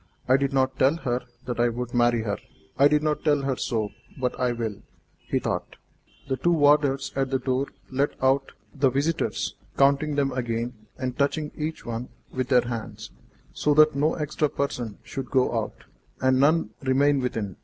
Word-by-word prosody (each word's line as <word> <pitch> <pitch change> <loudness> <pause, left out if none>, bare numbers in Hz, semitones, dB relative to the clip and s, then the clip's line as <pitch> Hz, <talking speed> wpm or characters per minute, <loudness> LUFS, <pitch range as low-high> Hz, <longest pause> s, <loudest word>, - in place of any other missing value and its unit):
"I 130 - +5
did 140 0 +1
not 130 -1 +1
tell 135 +4 +4
her 125 -5 -1 0.2
that 120 -2 -4
I 120 0 +4
would 120 +1 -5
marry 120 -1 +3
her; 105 -2 -2 0.4
I 140 - +6
did 150 +1 +2
not 150 -1 0
tell 145 -2 +2
her 135 -1 0
so, 110 -4 -2 0.3
but 125 -1 -1
I 125 -1 +2
will," 115 -4 -4 0.5
he - - +1
thought. - - -3 0.5
The 130 -1 -1
two 175 +7 +2
warders 145 -2 +3
at 135 -1 0
the 135 - +1
door 130 +1 -1 0.2
let 140 +2 +1
out 135 +1 +2 0.2
the 140 -1 +3
visitors, 145 +5 -1 0.2
counting 140 +2 +3
them 140 -1 +1
again, 120 -1 -2 0.2
and 125 -1 -3
touching 150 +2 0
each 155 +1 -4
one 120 +1 -4 0.2
with 130 -1 -1
their 125 -3 +4
hands, 115 -2 -6 0.4
so 150 -1 +1
that 155 0 +6
no 150 +3 +2
extra 150 0 -1
person 120 -7 -3
should 135 -3 -6
go 130 -2 +2
out, 110 -2 -3 0.4
and 130 0 +3
none 145 -4 +3
remain 140 +2 +3
within. 110 -7 -3
135 Hz, 180 wpm, -25 LUFS, 120-145 Hz, 0.5 s, I